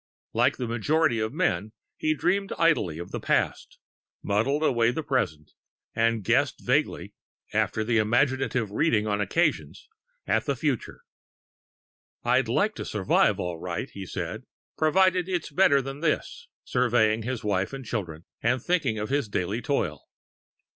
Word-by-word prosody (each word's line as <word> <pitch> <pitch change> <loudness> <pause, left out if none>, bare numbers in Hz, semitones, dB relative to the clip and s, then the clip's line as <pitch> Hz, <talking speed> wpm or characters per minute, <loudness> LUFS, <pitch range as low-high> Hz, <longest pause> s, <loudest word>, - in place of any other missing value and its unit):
Like 120 +5 +2
the 125 - -3
majority 120 +3 +1
of 110 0 -1
men, 110 - -1 0.2
he 155 0 0
dreamed 195 +5 0
idly 150 - +2
of 85 - -7
the - - -3
past, - - -1 0.5
muddled 130 +9 +1
away 120 -6 +3
the 140 +6 -2
present, 80 - -1 0.4
and 115 -1 +1
guessed - - +1
vaguely - - 0 0.4
after 110 - +1
imaginative 120 +1 +1
reading 110 -3 +2
on 105 -1 0
occasions 160 - -1 0.4
at - - +1
the - - 0
future. - - -3 1.2
"I'd - - +2
like 215 +1 +1
to - - -4
survive 100 -3 +2
all 85 -2 -3
right," 85 -1 -4
he 95 -2 -8
said, - - -5 0.3
"provided 185 +3 +3
it's 175 -4 -2
better 140 -4 +4
than 135 +2 -6
this," 155 0 -2 0.2
surveying 115 -3 +2
his 125 +1 -4
wife 100 -2 0
and 135 -2 -7
children, 90 -8 -4 0.2
and 125 +3 +2
thinking 145 -7 0
of 105 0 -3
his 140 -5 0
daily 100 +4 -2
toil. 100 - -2
120 Hz, 145 wpm, -26 LUFS, 105-150 Hz, 1.2 s, better